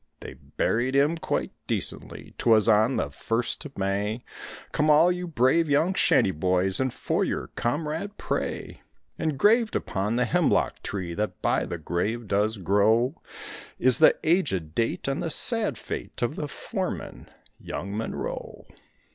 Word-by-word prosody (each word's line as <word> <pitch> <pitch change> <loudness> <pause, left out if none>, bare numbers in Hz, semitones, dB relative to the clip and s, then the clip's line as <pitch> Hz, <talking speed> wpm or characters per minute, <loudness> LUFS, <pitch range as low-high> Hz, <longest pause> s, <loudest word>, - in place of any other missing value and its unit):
They - - -8
buried 125 +4 -1
him 145 +4 +3
quite 165 - -2 0.2
decently; - - -5
'twas 110 -2 +4
on 110 +3 +4
the 70 - -2
first 115 +11 -2
of 140 - -10
May; 100 +4 -1 0.5
Come 150 +1 +1
all 155 +4 +6
you 180 0 -3
brave 155 +2 +2
young 160 +6 +2
shanty 95 - +3
boys 95 +3 +2
and 130 -1 0
for - - -1
your - - -3
comrade 155 - -3
pray. - - -4 0.4
Engraved 205 - +2
upon 100 +4 -1
the 125 +1 +2
hemlock 170 +3 +1
tree 90 -4 -4
that 105 +4 -3
by - - +1
the 85 - -4
grave 105 +8 -2
does 105 +3 +1
grow 110 - +2 0.6
Is 130 0 +3
the 160 - +6
aged 115 - +1
date 115 +5 -1
and 135 +5 -1
the 170 - -2
sad 215 - +2
fate - - -6
of - - -1
the - - -4
foreman, - - -5 0.3
young 100 +2 -6
Monroe. 110 +1 -5
120 Hz, 145 wpm, -26 LUFS, 100-155 Hz, 0.6 s, all